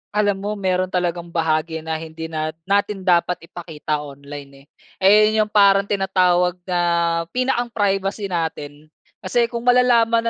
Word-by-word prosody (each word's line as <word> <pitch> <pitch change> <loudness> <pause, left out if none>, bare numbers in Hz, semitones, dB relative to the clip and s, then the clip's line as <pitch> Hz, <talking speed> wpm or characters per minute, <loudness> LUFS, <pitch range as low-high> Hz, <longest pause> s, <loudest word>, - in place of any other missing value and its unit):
Alam 205 -2 +1
mo 205 +2 -3
meron 185 -2 0
talagang 175 -1 -2
bahagi 160 -1 -1
na 160 0 -3
hindi 160 0 -8
nat 155 0 -3
natin 200 +1 0
dapat 180 -1 +1
ipakita 160 -3 -5
online, 140 -1 -10
eh. - - -27 0.4
Eh, 195 - +7 0.2
'yon 215 0 +2
yung 210 - -17
parang 200 -1 +5
tinatawag 185 -3 +1
na 180 -1 -2 0.6
pinakang 255 -1 0
privacy 200 -2 -1
natin. 155 -3 -4 0.3
Kasi 235 -1 0
kung 235 0 -5
malalaman 235 -2 +4
180 Hz, 145 wpm, -20 LUFS, 160-205 Hz, 0.6 s, Eh